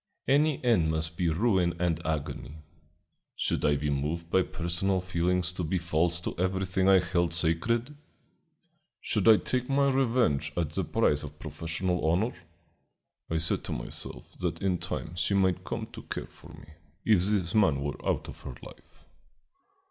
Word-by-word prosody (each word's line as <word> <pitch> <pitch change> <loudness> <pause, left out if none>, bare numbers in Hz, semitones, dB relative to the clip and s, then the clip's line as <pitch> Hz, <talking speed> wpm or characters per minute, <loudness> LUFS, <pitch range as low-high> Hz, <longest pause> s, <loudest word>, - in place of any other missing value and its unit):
"Any 145 0 +3
end 105 -10 +4
must 80 0 -1
be 85 0 +1
ruin 90 -1 +2
and 85 -2 0
agony. 80 0 -4 0.7
Should - - -1
I 75 - +4
be 75 +1 -1
moved 80 +4 -2
by 95 - +5
personal 95 +2 -1
feelings 90 0 0
to 90 - -3
be 85 +4 0
false 85 0 +1
to - - -4
everything 95 +1 +1
I 95 - +8
held 85 -1 0
sacred? 115 - 0 1.0
Should - - 0
I 110 -1 +9
take 125 +3 -2
my 140 0 +3
revenge 120 - +1
at 80 -4 0
the - - 0
price 75 0 +2
of 75 0 -8
professional 85 +3 -2
honor? 105 +9 +1 1.0
I 80 - 0
said 80 0 0
to - - -3
myself - - -6
that - - -2
in 95 -3 0
time 80 - -4
she 100 - +1
might 95 -2 +2
come - - -4
to - - -8
care - - -5
for 85 - -17
me, 80 -2 -13 0.3
if 100 -5 +4
this 95 -5 0
man 95 -10 +4
were 70 -1 -4
out - - -1
of - - -10
her 65 - -7
life. - - -15
90 Hz, 165 wpm, -29 LUFS, 80-95 Hz, 1.0 s, I